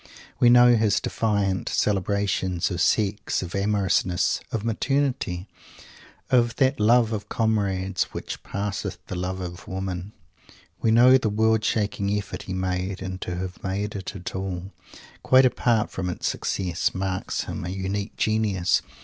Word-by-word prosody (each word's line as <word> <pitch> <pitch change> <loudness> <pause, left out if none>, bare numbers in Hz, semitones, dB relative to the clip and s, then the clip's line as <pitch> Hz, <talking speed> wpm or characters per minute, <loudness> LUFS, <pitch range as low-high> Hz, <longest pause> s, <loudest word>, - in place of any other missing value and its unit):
We 120 - +6
know 120 0 +7
his 110 -2 +2
defiant 100 -4 0
celebrations 95 -2 0
of 90 -1 -2
Sex, 105 0 +1
of 85 - -7
amorousness, 100 -3 +1
of 110 -1 -2
maternity; 115 -6 -1 0.9
of 120 -2 +3
that 135 0 +2
Love 115 +1 +4
of 105 -2 -4
Comrades 100 -4 0
which - - -7
"passeth 100 -1 -4
the - - -6
love 95 +1 -3
of 90 -1 -7
women." 95 +1 -4 0.7
We 115 - +2
know 125 +4 +7
the 110 - 0
world 110 +1 +2
shaking 105 -2 0
effort 105 - -5
he - - -2
made 95 +1 -2
and 95 0 -5
to 90 - -3
have 90 0 -6
made 100 +2 -2
it 95 -1 -6
at 90 -1 -6
all, 95 0 -4 0.5
quite 130 0 +5
apart 120 -3 +1
from 90 -1 -3
its 90 - -3
success, 90 -3 -1
marks 95 -1 -2
him - - -5
a 90 - -4
unique 95 +2 -3
genius! 110 -5 +1
100 Hz, 150 wpm, -25 LUFS, 95-110 Hz, 0.9 s, know